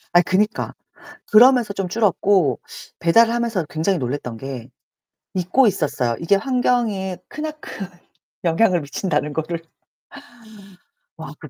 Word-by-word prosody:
아이 175 - +8
그니까. 210 +5 0 0.6
그러면서 235 -2 +6
좀 195 -2 -2
줄었고 190 - +2 0.4
배달을 230 +7 +4
하면서 230 -7 -1
굉장히 170 +4 0
놀랐던 125 -3 -4
게 135 -3 -7 0.7
잊고 185 +8 +3
있었어요. 145 - 0
이게 170 +4 +2
환경에 225 -6 0
크나큰 305 -10 -7 0.6
영향을 175 +1 +2
미친다는 150 0 -2
거를. 165 +2 -3 1.6
와 160 -1 -8
그 155 - -11
185 Hz, 265 characters per minute, -21 LUFS, 155-225 Hz, 1.6 s, 아이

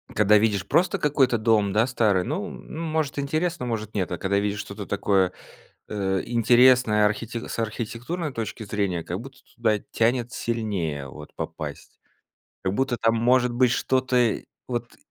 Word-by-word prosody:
Когда 105 0 +5
видишь 100 -4 +1
просто 185 - +2
какой-то 140 -6 +2
дом 110 -2 +2
да 110 +3 +3
старый, 110 -7 +2
ну 185 - -3
ну 160 - -8
может 155 -3 -1
интересно, 155 +1 -1
может 110 -3 -3
нет, 95 -3 -1
а 90 - -2
когда 100 +2 +1
видишь 105 0 -1
что-то 100 -1 -7
такое, 95 -2 +2 0.6
э, 95 -2 -1
интересное 120 -2 +5
архи 105 +2 -1 0.2
с - - -5
архитектурной 120 +8 -3
точки 115 -1 -5
зрения, 100 -4 -1
как 90 +4 -4
будто 135 +2 -11 0.2
туда 110 -3 +1
тянет 120 +1 +1
сильнее 95 - -2
вот 75 +2 -11
попасть. - - -7 0.6
Как 95 - 0
будто 130 +3 0
там 115 0 +2
может 125 +2 +3
быть 125 0 +3
что-то, 130 0 +1
э, 120 -3 +2 0.2
вот 120 -1 -4
115 Hz, 160 wpm, -25 LUFS, 100-125 Hz, 0.6 s, Когда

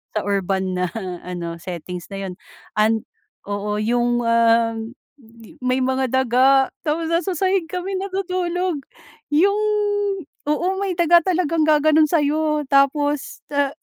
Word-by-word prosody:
sa 215 - -1
urban 190 -2 -1
na 180 -1 -1 0.3
ano 170 -2 -6
settings 175 0 -7
na 195 - -6
yun - - -6 0.5
an 220 0 +2 0.4
oo 205 +1 -3
yung, 240 +2 +1
uhm, 230 0 +2 0.7
may 255 0 +1
mga 260 0 0
daga 260 +1 +3
tapos 320 +2 -2
nasa 355 +1 0
sahig 375 -2 +1
kami 365 +2 -4
natutulog 365 -4 -2 0.5
yung 390 +8 +3 0.9
oo 315 +4 +1
may 370 -3 -2
daga 345 0 +5
talagang 335 -3 0
gaganon 310 0 +4
sayo 300 -1 +1
tapos, 280 +1 +1
ah, 285 -1 +2
275 Hz, 120 wpm, -21 LUFS, 225-335 Hz, 0.9 s, daga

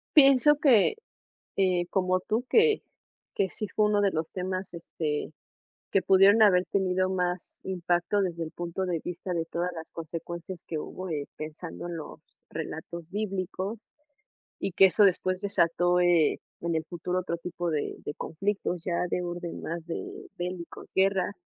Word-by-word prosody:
Pienso 280 +1 +7
que, 270 - +5 0.6
eh, 180 -2 +2
como 185 -1 +2
tú, 220 +6 -1
que 445 -1 +5 0.5
que 190 -2 +1
sí 215 - -4
fue 215 +1 +2
uno 205 -1 +2
de 200 -2 +3
los 160 0 -2
temas 185 0 -3
este, 155 -2 -3 0.6
que 195 - +4
pudieron 195 +4 +6
haber 185 -4 +6
tenido 185 -1 +1
más 180 -1 -2
impacto 180 +2 0
desde 170 -3 -2
el 160 - -7
punto 175 +2 -3
de 170 -2 0
vista 180 +1 -4
de 165 -1 0
todas 175 +2 -2
las 160 0 -8
consecuencias 170 +2 -6
que 160 - -3
hubo 185 +4 -6
de 145 -3 -3
pensando 160 +3 -7
en 170 -1 -4
los 150 - -9 0.3
relatos 165 +1 -6
bíblicos, 195 0 -3 0.8
y 190 - -2
que 195 - +8
eso 205 +2 +5
después 185 0 +2
desató, 175 -2 +2
eh, 175 -3 +4 0.2
en 170 -1 -1
el 160 - 0
futuro 180 +1 -2
otro 170 -2 -3
tipo 175 0 -4
de 150 - -1
de 145 - -3
conflictos 180 0 -2
ya 180 0 0
de 180 - 0
orden 175 -1 -5
más 165 0 -5
de 165 - -6
bélicos, 175 -1 -6
guerra. 190 0 +2
180 Hz, 160 wpm, -28 LUFS, 170-195 Hz, 0.8 s, que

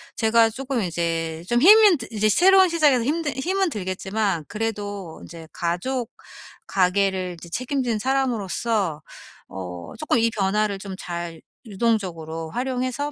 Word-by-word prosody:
제가 225 0 +4
쪼끔 260 +1 -3
이제 165 -1 -2
좀 240 +1 +2
힘은 410 -1 +8
드 - - -8
이제 215 0 +1
새로운 380 - +6
시작에서 295 -7 +3
힘든 300 +3 -1
힘은 370 +6 0
들겠지만 190 - -2
그래도 205 -5 -4
인제 165 -1 -11
가족 220 +9 -2 0.6
가계를 185 -1 +1
이제 170 - -11
책임진 250 0 -2
사람으로서 225 - -1 0.5
어 90 -2 -8
쪼끔 290 -6 +1
이 230 0 +3
변화를 205 0 0
좀 195 -1 -7
잘 170 -2 -6 0.2
유동적으로 185 -8 -2
활용해서 255 - -2
215 Hz, 295 characters per minute, -23 LUFS, 175-255 Hz, 0.6 s, 힘은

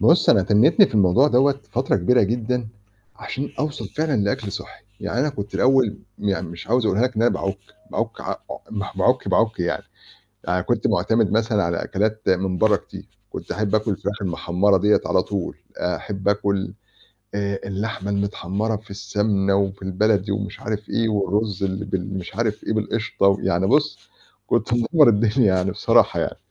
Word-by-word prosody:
بُصّ، 165 - +5
أنا 100 -5 +5
تنّيتني 125 - +5
في - - -10
الموضوع 105 +8 +4
دَوّة 140 +2 +3
فترة 125 -3 +1
كبيرة 120 +7 +3
جدًا 120 +2 -1 0.5
عشان 140 +2 -5
أوصل 150 +2 -3
فعلًا 155 -3 -1
لأكل 100 0 -2
صحّي، - - -8 0.2
يعني 125 - -2
أنا 150 - +1
كنت 105 -7 -6
الأول 130 -4 +3 0.2
يعني 95 -3 -2
مش 85 0 -9
عاوز 120 0 +2
أقولها 105 +2 +2
لك 125 -2 0
إن 110 - +2
أنا 120 - +4
باعُك، 95 0 -2 0.3
باعُك - - -3
عا - - -3
عو - - -6
مه 100 -3 -4
باعُك، 125 +7 +2
باعُك 110 -4 +1
يعني. 85 - -2 0.6
أنا - - +1
كنت - - 0
معتمد 110 -2 +2
مثلًا 110 -1 +1
على 85 0 -1
أكلات 110 +2 -1
من 95 -1 +1
برّا 105 -2 +4
كتير، - - -11 0.2
كنت - - -6
أحب 105 0 -1
آكُل 110 0 +1
الفراخ 100 +2 -4
المحمّرة 95 +2 +1
دِيّة 105 +3 +3
على 90 - +2
طول، 100 -4 -4 0.2
أحب 95 +2 -3
آكُل 100 -1 0 0.6
آآ 100 -1 -2
اللحمة 100 0 -4
المتحمّرة 100 +2 -1
في 110 +1 -14
السَمنة 100 -1 0
وفي 100 -1 -1
البلد 100 +1 +1
ومش 100 0 -3
عارف 105 -1 -4
إيه 115 -1 0
والرُز 105 -1 -1
اللي 95 +2 -2
بال 95 0 -3
مش 90 - -8
عارف 110 -2 -1
إيه - - -1
بالقشطة 110 -1 0
ويعني 95 -2 +2
بُصّ، 150 +5 +2 0.5
كنت - - 0
مِدمّر 140 +5 +4
الدنيا 110 -1 +3
يعني 95 +1 0
بصراحة - - +3
يعني. - - -2
105 Hz, 175 wpm, -22 LUFS, 95-115 Hz, 0.6 s, بُصّ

